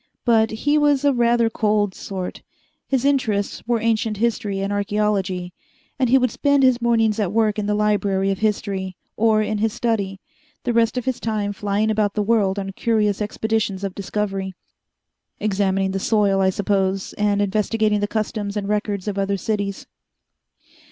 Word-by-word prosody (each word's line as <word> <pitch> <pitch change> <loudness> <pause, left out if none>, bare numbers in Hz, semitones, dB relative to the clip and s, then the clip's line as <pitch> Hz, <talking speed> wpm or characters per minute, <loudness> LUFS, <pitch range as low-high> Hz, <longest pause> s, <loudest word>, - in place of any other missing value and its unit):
But 225 -2 +4
he 290 +7 +1
was 290 -1 +2
a 285 - +4
rather 235 -1 +3
cold 210 -3 +1
sort: 185 -1 -6 0.5
his 265 -1 0
interests 220 -8 0
were 240 -1 +2
ancient 220 -1 0
history 210 -3 -1
and 195 +1 -2
archeology, 200 -3 -1 0.5
and 255 -3 +2
he 265 - +6
would 255 -3 +1
spend 285 +1 +2
his 255 -2 +4
mornings 225 -2 +2
at 200 -4 0
work 215 -1 +1
in 205 - -2
the 210 - +1
Library 200 -2 +1
of 195 - -3
History 200 -3 -2 0.2
or 215 -1 +3
in 215 0 -2
his 220 0 0
study, 210 -5 -1 0.4
the 240 - 0
rest 230 +1 +2
of 250 - -2
his 260 -2 -1
time 210 -2 -2
flying 205 +2 0
about 210 -2 0
the 210 - +1
world 205 -3 +2
on 195 -1 -3
curious 210 -1 0
expeditions 210 -2 -1
of 195 -2 -3
discovery 195 -1 -3 0.8
examining 195 -2 0
the 195 - -2
soil, 200 -2 +2
I 190 - +4
suppose, 195 0 -1
and 205 -1 +1
investigating 210 +1 +1
the 205 - 0
customs 215 -1 -3
and 200 -1 -3
records 205 -1 -2
of 200 -1 -2
other 195 0 0
cities. 200 0 -3
210 Hz, 170 wpm, -22 LUFS, 200-225 Hz, 0.8 s, he